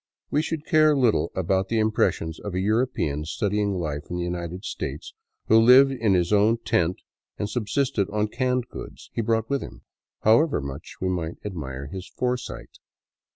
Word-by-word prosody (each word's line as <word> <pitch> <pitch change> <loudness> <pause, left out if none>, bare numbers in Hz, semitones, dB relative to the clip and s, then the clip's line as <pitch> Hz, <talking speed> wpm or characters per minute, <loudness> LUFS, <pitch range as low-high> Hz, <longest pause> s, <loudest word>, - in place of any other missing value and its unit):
We 150 - +3
should 160 -1 -4
care 155 -2 +4
little 120 -5 +2
about 95 +1 +1
the 115 - 0
impressions 110 -7 +1
of 100 -3 -6
a - - 0
European 100 - 0
studying 100 +4 -1
life 75 -4 -3
in 90 - -3
the 90 - -2
United 90 +2 -4
States 450 - -5 0.3
who 110 - +6
lived 130 +4 +7
in 115 -7 +1
his 90 +2 +1
own 105 +3 +4
tent 85 +2 +1 0.4
and 105 - -2
subsisted 110 -1 -1
on 105 0 0
canned 125 0 0
goods - - -10
he - - -1
brought 115 0 0
with 140 0 -1
him, - - -10 0.4
however 120 +9 +4
much 70 +2 -7
we 95 - -1
might 85 -3 -3
admire 70 -9 -5
his 90 +6 -7
foresight. 125 - -4
105 Hz, 170 wpm, -25 LUFS, 85-125 Hz, 0.4 s, lived